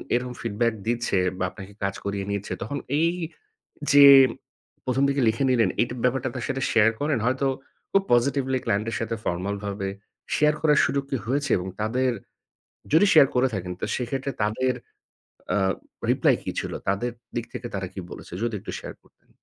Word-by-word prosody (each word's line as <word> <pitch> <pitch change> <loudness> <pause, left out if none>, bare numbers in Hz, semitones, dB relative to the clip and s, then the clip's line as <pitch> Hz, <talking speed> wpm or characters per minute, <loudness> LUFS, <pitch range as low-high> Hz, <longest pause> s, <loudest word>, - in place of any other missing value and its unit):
এরকম 125 0 -2
feedback 115 +1 0
দিচ্ছে 120 -4 0 0.2
বা 95 - +1
আপনাকে 100 0 -11
কাজ 100 0 -1
করিয়ে 100 -1 -2
নিচ্ছে 100 0 -3
তখন 145 - -4 0.2
এই 165 +1 +3 0.8
যে 145 0 +9 0.8
প্রথম 130 +1 +1
থেকে 140 0 +1
লিখে 115 +5 -1
নিলেন 115 -6 +3
এই 120 - +2 0.2
ব্যাপারটা 130 0 +1
তার - - -3
সাথে 135 0 -2
share 110 0 +4
করেন। 145 -4 +1
হয়তো 130 +2 +1 0.5
খুব 195 - +4
positively 130 +1 +2
client 105 +3 0
এর - - -3
সাথে 115 0 -2
formal 95 +4 -1
ভাবে 100 -1 -3 0.5
share 150 0 +3
করার 150 -2 +4
সুযোগ 140 0 0
কি 135 - +1
হয়েছে 140 +2 0
এবং 90 +1 -4
তাদের 125 +4 +1 0.8
যদি 185 +6 +6
share 145 -4 +7
করে 130 +1 +4
থাকেন 90 -1 -3
তো - - -1
সেক্ষেত্রে 135 +2 -3
তাদের, 125 +4 +1 0.8
আ - - +3 0.5
reply - - +4
কি - - -2
ছিল? - - -5 0.2
তাদের 120 +5 0 0.2
দিক 120 - -2
থেকে 125 0 -5
তারা 95 -1 -2
কি 95 - -5
বলেছে - - -10
যদি 120 -2 -1
একটু - - -7
share - - -8
করতেন। - - -30
120 Hz, 175 wpm, -25 LUFS, 105-135 Hz, 0.8 s, যে